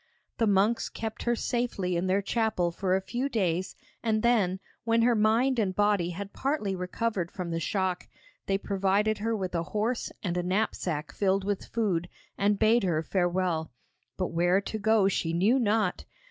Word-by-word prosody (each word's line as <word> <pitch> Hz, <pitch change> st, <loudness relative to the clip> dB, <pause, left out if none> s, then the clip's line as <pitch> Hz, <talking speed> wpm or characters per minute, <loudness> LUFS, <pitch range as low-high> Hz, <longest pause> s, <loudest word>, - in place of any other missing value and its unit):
The 225 Hz, -, +3 dB
monks 205 Hz, +3 st, +2 dB
kept 220 Hz, 0 st, -5 dB
her 240 Hz, 0 st, +2 dB
safely 230 Hz, -7 st, -1 dB
in 175 Hz, +2 st, 0 dB
their 195 Hz, +2 st, +1 dB
chapel 200 Hz, -5 st, 0 dB
for 185 Hz, +1 st, 0 dB
a 190 Hz, -, 0 dB
few 250 Hz, +7 st, -2 dB
days, 185 Hz, -6 st, -1 dB, 0.3 s
and 220 Hz, -1 st, 0 dB
then, 205 Hz, -6 st, +2 dB, 0.2 s
when 230 Hz, 0 st, +2 dB
her 240 Hz, 0 st, +4 dB
mind 230 Hz, +4 st, +3 dB
and 190 Hz, -4 st, 0 dB
body 205 Hz, -4 st, +2 dB
had 195 Hz, +3 st, -6 dB
partly 265 Hz, -9 st, -1 dB
recovered 180 Hz, 0 st, -2 dB
from 180 Hz, -2 st, -5 dB
the 165 Hz, -, -1 dB
shock, 185 Hz, +1 st, -1 dB, 0.4 s
they 195 Hz, -, +2 dB
provided 200 Hz, +2 st, +1 dB
her 225 Hz, +2 st, 0 dB
with 185 Hz, -4 st, -3 dB
a 170 Hz, -, 0 dB
horse 215 Hz, +7 st, -2 dB
and 175 Hz, -3 st, -1 dB
a -, -, +1 dB
knapsack 175 Hz, -5 st, -1 dB
filled 195 Hz, -1 st, +1 dB
with 200 Hz, 0 st, -2 dB
food, 185 Hz, -7 st, -1 dB, 0.3 s
and 205 Hz, +1 st, +2 dB
bade 225 Hz, +3 st, +4 dB
her 165 Hz, -4 st, +1 dB
farewell. 175 Hz, -4 st, 0 dB, 0.5 s
But -, -, -1 dB
where 175 Hz, +3 st, +3 dB
to 215 Hz, +2 st, -5 dB
go 215 Hz, -1 st, +3 dB
she 165 Hz, -4 st, 0 dB
knew 205 Hz, +10 st, +3 dB
not. 215 Hz, -5 st, +1 dB
200 Hz, 175 wpm, -28 LUFS, 180-220 Hz, 0.5 s, her